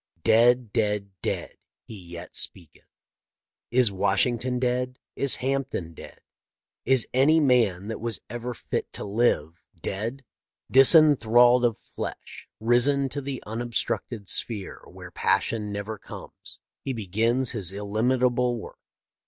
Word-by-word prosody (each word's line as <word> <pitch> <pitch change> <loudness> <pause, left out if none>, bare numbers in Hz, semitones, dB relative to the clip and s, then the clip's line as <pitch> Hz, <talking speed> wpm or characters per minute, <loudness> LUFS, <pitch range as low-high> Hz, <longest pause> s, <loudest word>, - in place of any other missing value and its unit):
Dead, 120 0 +4
dead, 105 -2 -1
dead, - - -4 0.3
he - - -12
yet 85 -3 -10
speaketh. 85 -4 -3 0.8
Is 120 -3 +3
Washington 120 +6 0
dead? 125 0 -1 0.2
Is 140 -1 +2
Hampden 130 -10 -3
dead? - - -12 0.6
Is 130 -2 +3
any 145 +5 +4
man 115 - +2
that 110 - -4
was 115 -2 -3
ever 120 +2 -5
fit - - -4
to - - -6
live 100 -7 0 0.2
dead? 115 +7 -5 0.5
Disenthralled 125 -4 +7
of 115 -2 0
flesh, - - -8
risen 130 +5 +2
to 145 +3 -5
the 135 -2 -6
unobstructed 115 -1 -3
sphere 105 -3 -3
where - - -12
passion 105 -2 0
never 100 +1 -5
comes, - - -10 0.2
he 135 - -3
begins 115 +4 0
his 100 -7 -2
illimitable 120 +4 0
work. 110 - -10
120 Hz, 120 wpm, -25 LUFS, 105-125 Hz, 0.8 s, Disenthralled